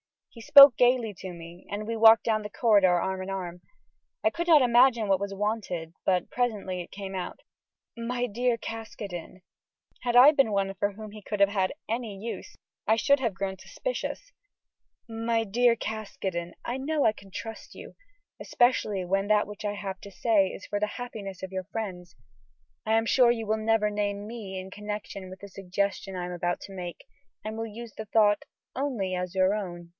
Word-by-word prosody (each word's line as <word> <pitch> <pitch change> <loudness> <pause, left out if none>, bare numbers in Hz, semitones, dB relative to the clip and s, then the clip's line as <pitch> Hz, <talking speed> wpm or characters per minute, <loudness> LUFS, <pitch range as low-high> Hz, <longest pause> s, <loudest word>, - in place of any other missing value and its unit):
He 230 - -13
spoke 280 -1 +9
gayly 245 -3 +3
to 185 -1 -7
me, 170 +1 -12
and 205 +1 -4
we 230 +1 -3
walked 225 0 +7
down 220 -2 +1
the 210 - -6
corridor 200 -6 +4
arm 190 +1 -2
in 185 - -6
arm. 180 -2 -5 0.6
I 325 - +4
could 340 +1 -4
not 315 -4 +7
imagine 240 -2 +4
what 190 -1 +3
was 200 0 -4
wanted, 195 -5 -3
but 180 -2 +1
presently 210 -7 -1
it 175 - -10
came 195 -1 -7
out: 185 -2 -5 0.6
"My 245 +1 -2
dear 240 +2 0
Caskoden" 210 -6 -7 0.6
had 240 -1 0
I 255 +4 +9
been 275 -8 +2
one 195 -1 0
for 200 +1 -1
whom 215 +1 -9
he 215 0 -10
could 205 0 -4
have 200 - +6
had 190 -2 0 0.2
any 225 -3 -3
use, 225 +4 -7 0.3
I 220 - +5
should 280 +5 +3
have 235 -6 -1
grown 190 -1 -4
suspicious - - -5 0.8
"My 225 0 -1
dear 235 +3 +3
Caskoden, 195 -6 -4
I 245 - -2
know 290 +2 0
I 220 - +5
can 200 -2 -15
trust 225 +4 -8
you; - - -11 0.4
especially 215 -6 +1
when 195 +2 0
that 210 0 +3
which 210 +1 -9
I 205 - -1
have 195 -2 -5
to 200 - -10
say 205 -1 +2
is 185 - -8
for 205 - -2
the 210 - +1
happiness 210 -7 -7
of 190 - -5
your 185 -1 -4
friends. 185 -4 -6 0.7
I 220 - +1
am 225 0 +3
sure 245 0 +5
you 225 -2 -2
will 215 +1 0
never 220 -1 +2
name 205 -1 -2
me 215 -5 -7
in 190 +1 -9
connection 210 -2 -6
with 185 +1 -11
the 200 - -9
suggestion 195 0 -3
I 180 -1 -3
am 180 - -6
about 175 0 -2
to 195 - -10
make, 175 -2 -7 0.4
and 215 +1 -5
will 225 0 -3
use 225 +1 -9
the 220 - -6
thought 210 -1 +3 0.3
only 245 -9 -2
as 180 0 -3
your 190 +1 +3
own." 175 -5 -5
210 Hz, 195 wpm, -27 LUFS, 190-230 Hz, 0.8 s, spoke